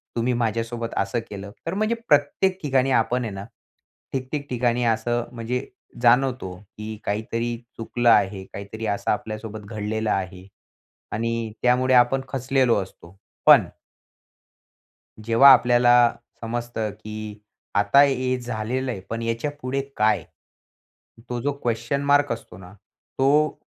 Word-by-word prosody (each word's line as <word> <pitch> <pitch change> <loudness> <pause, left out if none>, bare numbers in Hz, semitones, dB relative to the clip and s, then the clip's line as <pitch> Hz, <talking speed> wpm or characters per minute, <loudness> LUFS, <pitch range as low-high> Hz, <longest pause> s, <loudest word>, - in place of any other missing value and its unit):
तुम्ही 120 +2 +1
माझ्यासोबत 115 0 -2
असं 100 +5 0
केलं. 100 0 -8
तर 165 - -2
म्हणजे 215 +3 0
प्रत्येक 150 +6 +2
ठिकाणी 135 -2 +2
आपण 120 +1 +2
आहे 110 -3 -4
ना 100 +1 -7 0.7
ठिकठिक 140 +2 -4
ठिकाणी 120 -1 0
असं 115 +1 0
म्हणजे 125 +2 -3 0.4
जाणवतो 125 -4 +3 0.3
की 110 0 -6
काहीतरी 115 +3 -2 0.2
चुकलं 120 +1 0
आहे. 95 -3 +3
काहीतरी 100 +3 -7
असं 100 - -1
आपल्यासोबत 110 0 -4
घडलेलं 110 0 -3
आहे 95 0 -3 0.6
आणि 115 0 -2
त्यामुळे 125 +1 +3
आपण 125 +2 +4
खचलेलो 130 -2 +1
असतो. 95 0 -16 0.3
पण - - +8 1.6
जेव्हा 115 +5 +6
आपल्याला 120 0 +5 0.5
समजतं, 115 -2 -3
की 110 0 -8 0.3
आता 100 +7 +5
हे 130 -2 +1
झालेलं 120 +2 -3
आहे, 100 - -5
पण 115 0 -3
याच्या 115 +5 -2
पुढे 135 +2 -1 0.2
काय? 110 +1 +2 1.0
तो 120 -1 -3
जो 145 +1 0
क्वेस्चन 120 +4 -1
मार्क 145 0 +3
असतो 90 - -8
ना, 90 0 -13 0.5
तो 145 +3 +3
120 Hz, 125 wpm, -23 LUFS, 110-130 Hz, 1.6 s, पण